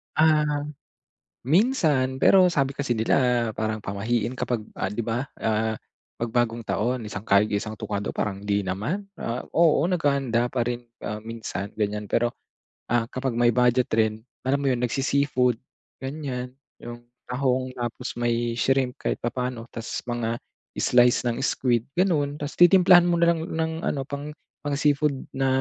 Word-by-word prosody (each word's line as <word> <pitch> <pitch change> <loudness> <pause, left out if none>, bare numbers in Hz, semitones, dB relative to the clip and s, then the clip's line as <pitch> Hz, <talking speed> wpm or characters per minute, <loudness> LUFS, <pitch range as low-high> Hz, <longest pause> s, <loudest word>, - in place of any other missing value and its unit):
Ah, 150 -2 +3 0.8
minsan 145 - +2
pero 185 -2 +6
sabi 140 -3 0
kasi 140 -3 -1
nila 120 +1 +2
parang 110 0 -2
pamahiin 110 +5 -2
kapag, 120 -2 -1 0.2
ah, 95 - -2
'di 105 - -3
ba, 115 +3 -1 0.2
ah, 110 0 +1 0.5
'pag 115 - -1
bagong 120 0 0
taon, 120 +4 0
isang 105 0 -6
kayod, 100 0 +4
isang 110 +1 -2
tuka 105 - -3
daw, - - -3
parang 100 -1 -3
hindi 100 0 +1
naman. 110 - -3
Ah, 120 -3 -3 0.2
oo 165 -3 +5
naghahanda 140 -8 +1
pa 130 - 0
rin, 120 0 -4 0.2
ah, 105 - -4
minsan, 110 -3 -5
ganyan 105 0 -1
pero, 120 +3 0 0.5
ah, 120 0 +2
kapag 130 -2 -2
may 120 0 +4
budget 125 +1 +2
rin, 110 0 +1 0.2
alam 135 - +3
mo 135 - +2
yun 125 - 0
nagsi-seafood, 125 -1 +1 0.4
ganyan, 130 -3 -5 0.2
yung 120 0 -9 0.2
tahong, 130 0 -1
tapos 120 -2 -4
may 120 0 0
shrimp 130 +2 +1
kahit - - -1
papaano, 120 -1 -3
ta's 115 0 -5
mga 120 -1 -2 0.4
slice 125 0 +4
ng 115 -1 -1
squid, 120 -3 +1
gano'n. 150 -4 +1
Ta's 145 0 -5
titimplahan 175 0 +7
mo 175 -1 +1
na 170 0 +4
lang 160 - -4
ng 160 0 -1
ano 135 -2 -2
pang 145 +1 -5 0.3
pang-seafood 145 0 +2 0.2
na 135 0 +1
125 Hz, 155 wpm, -25 LUFS, 115-140 Hz, 0.8 s, titimplahan